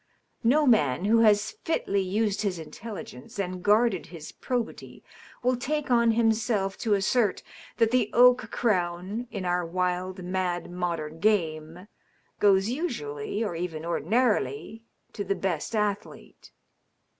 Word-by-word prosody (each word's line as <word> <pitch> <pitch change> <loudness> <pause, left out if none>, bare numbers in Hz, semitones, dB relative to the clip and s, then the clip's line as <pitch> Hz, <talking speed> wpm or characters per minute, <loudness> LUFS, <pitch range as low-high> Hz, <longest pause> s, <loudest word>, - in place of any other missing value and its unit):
No 290 +6 +4
man 180 - +3
who 225 +2 +4
has 215 -1 +4
fitly 200 -11 0
used 205 +2 0
his 195 -4 -1
intelligence 165 - -9
and 185 -2 -3
guarded 210 0 +2
his 160 -2 -9
probity 245 -3 -5 0.4
will 250 +1 +3
take 280 +3 -2
on 235 -1 +4
himself 220 -3 +1
to 215 -3 +2
assert 200 +1 +1 0.3
that 230 -1 +3
the 245 -4 +2
oak 245 -1 +5
crown, 190 +1 -1
in 200 -6 -5
our 180 0 +1
wild, 180 +2 -2
mad 180 -1 -2
modern 165 -3 -3
game, 165 -3 0 0.5
goes 195 -1 +4
usually 225 - -3
or 205 - -2
even 165 -2 -4
ordinarily 190 - 0 0.3
to 205 - -4
the 195 0 -1
best 190 +3 -2
athlete. 210 -1 -4
200 Hz, 130 wpm, -27 LUFS, 175-230 Hz, 0.5 s, oak